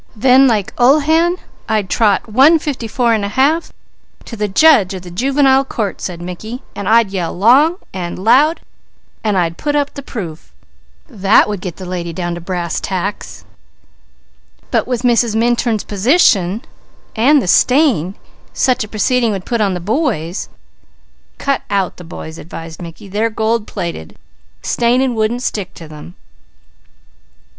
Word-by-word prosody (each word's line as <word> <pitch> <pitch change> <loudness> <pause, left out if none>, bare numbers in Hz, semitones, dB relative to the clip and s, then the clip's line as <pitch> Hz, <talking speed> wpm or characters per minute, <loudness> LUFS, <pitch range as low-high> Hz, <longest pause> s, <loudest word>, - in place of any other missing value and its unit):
"Then 260 +4 +5
like 220 -2 0
Ulhan 315 +7 +3 0.3
I'd 215 -3 0
trot 205 0 +2
1:54 270 +1 +2 0.3
1/2 275 +11 +1 0.6
to 230 - -8
the 210 -1 -2
judge 205 - +4
of 185 - -8
the 175 - -10
Juvenile 270 +6 +2
Court," 215 -7 -4
said 175 -2 -5
Mickey, 215 +8 -7
"and 200 - -3
I'd 225 -3 +4
yell 180 -3 -3
long 265 - +4 0.2
and 175 -2 -5
loud, 270 - +3 0.6
and 210 -3 0
I'd 170 -2 -1
put 295 -1 -1
up 290 -1 0
the 280 - -7
proof. 175 - -8 0.6
That 205 -5 +3
would 205 -3 -4
get 180 -3 -6
the 185 - -9
lady 175 -2 -4
down 175 0 -3
to 170 - -7
brass 175 -1 -3
tacks. 195 +2 -3
See?" - - -13 1.3
"But - - +1
with 245 -1 -2
Mrs. 235 -2 +2
Minturn's 230 -1 +1
position 205 - +2 0.5
and 275 +7 +4
the 250 - -3
stain 240 - +3 0.4
such 255 -3 +1
a - - -8
proceeding 230 +3 +1
would 190 -2 -5
put 235 -2 -1
on 195 -3 +1
the - - -3
boys 200 - -2 0.4
" - - -39
"Cut 275 -1 -1
out 195 -3 -1
the 180 - -10
boys," 160 -1 -9
advised 165 +1 -9
Mickey. 170 +3 -10
"They're 210 +4 -1
gold 220 0 -1
plated, 165 - -6 0.5
staining 245 +2 +1
wouldn't 230 +2 -1
stick 200 -6 -4
to 165 - -11
them." 155 +3 -12
215 Hz, 150 wpm, -16 LUFS, 185-255 Hz, 1.3 s, Then